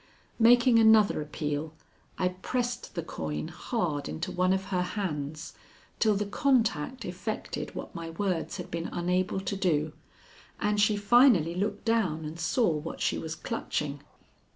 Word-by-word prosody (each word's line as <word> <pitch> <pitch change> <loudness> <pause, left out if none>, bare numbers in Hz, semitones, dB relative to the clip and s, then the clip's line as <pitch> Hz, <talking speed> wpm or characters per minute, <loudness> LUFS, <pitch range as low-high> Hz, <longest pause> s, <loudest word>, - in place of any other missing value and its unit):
Making 240 +1 +6
another 220 -6 +5
appeal, 150 +1 -3 0.4
I 180 - +1
pressed 240 +6 -3
the 170 - -2
coin 75 - -4
hard 170 - -2
into 175 +3 -4
one 185 0 +2
of 190 0 +1
her 180 - +2
hands 155 -6 -4 0.5
till 215 -2 +4
the 205 +1 -1
contact 230 - +1
effected 180 +4 -5
what - - -6
my 165 -1 -6
words 180 0 -2
had 180 -1 -7
been 165 0 -3
unable 180 +2 0
to 195 +1 -3
do, 160 -5 0 0.7
and 210 0 +1
she 210 0 +3
finally 205 - +5
looked 205 +3 -2
down 190 -9 +1
and 155 +2 -7
saw 215 +7 +2
what 155 +1 -4
she - - 0
was 160 0 -5
clutching. 145 -10 -3
185 Hz, 150 wpm, -29 LUFS, 160-215 Hz, 0.7 s, Making